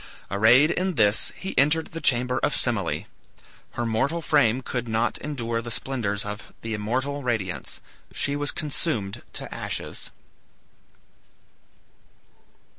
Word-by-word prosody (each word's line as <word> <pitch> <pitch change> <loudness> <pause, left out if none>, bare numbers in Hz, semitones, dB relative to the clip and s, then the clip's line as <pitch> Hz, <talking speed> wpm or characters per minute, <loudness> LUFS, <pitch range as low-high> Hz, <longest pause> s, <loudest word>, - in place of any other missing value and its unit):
Arrayed 120 +10 +6
in 185 -1 0
this, 105 -3 +3
he 190 - -5
entered 150 +4 +3
the 165 - -5
chamber 125 -2 +2
of - - +1
Semele. - - 0 0.7
Her 120 - -2
mortal 135 +9 0
frame 130 -6 +3
could 120 -1 -3
not 115 +1 0
endure 115 -6 -2
the 120 - -6
splendors 110 -5 -1
of 105 0 -6
the 115 -1 -3
immortal 130 +7 -1
radiance. 95 - -2 0.3
She 140 - 0
was 145 0 0
consumed 135 - -2
to - - -5
ashes. - - -4
120 Hz, 120 wpm, -25 LUFS, 110-145 Hz, 0.7 s, Arrayed